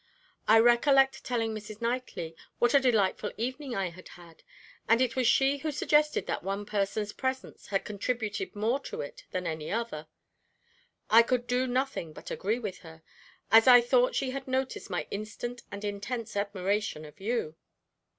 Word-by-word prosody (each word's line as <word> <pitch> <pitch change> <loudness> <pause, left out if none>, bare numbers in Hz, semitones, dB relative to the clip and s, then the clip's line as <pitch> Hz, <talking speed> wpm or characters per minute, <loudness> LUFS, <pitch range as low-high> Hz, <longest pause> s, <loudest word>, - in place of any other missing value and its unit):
I 220 - +7
recollect 265 +3 +4
telling 225 -3 -1
Mrs. 215 0 -8
Knightley 230 -9 -3 0.2
what 240 - +3
a 280 - +7
delightful 215 -5 +1
evening 255 +2 -3
I 190 -3 -1
had 185 +2 -13
had, 170 -2 -15 0.5
and 230 +1 +5
it 255 -2 +1
was 255 -2 +2
she 270 +3 +3
who 310 +2 -2
suggested 300 +1 +2
that - - -2
one 195 +3 -3
person's 205 0 -1
presence 260 0 -4
had 195 -1 -1
contributed 220 - -3
more 225 +6 +1
to - - -6
it 145 - -9
than 185 -1 -3
any 160 -2 -4
other. 220 -9 -3 1.0
I 225 +2 +9
could 245 +1 0
do 250 +1 0
nothing 255 - -2
but - - -10
agree 215 +4 -1
with 210 -6 -5
her, 160 -1 -14 0.5
as 225 +2 +7
I 245 -1 +10
thought 245 +1 +2
she 265 -2 0
had 270 0 -6
noticed 260 -3 -2
my 180 - -2
instant 215 +4 -5
and 200 +1 -6
intense 210 +3 -4
admiration 200 -4 -1
of 150 +6 -14
you. 200 -6 -2
225 Hz, 170 wpm, -29 LUFS, 200-255 Hz, 1.0 s, I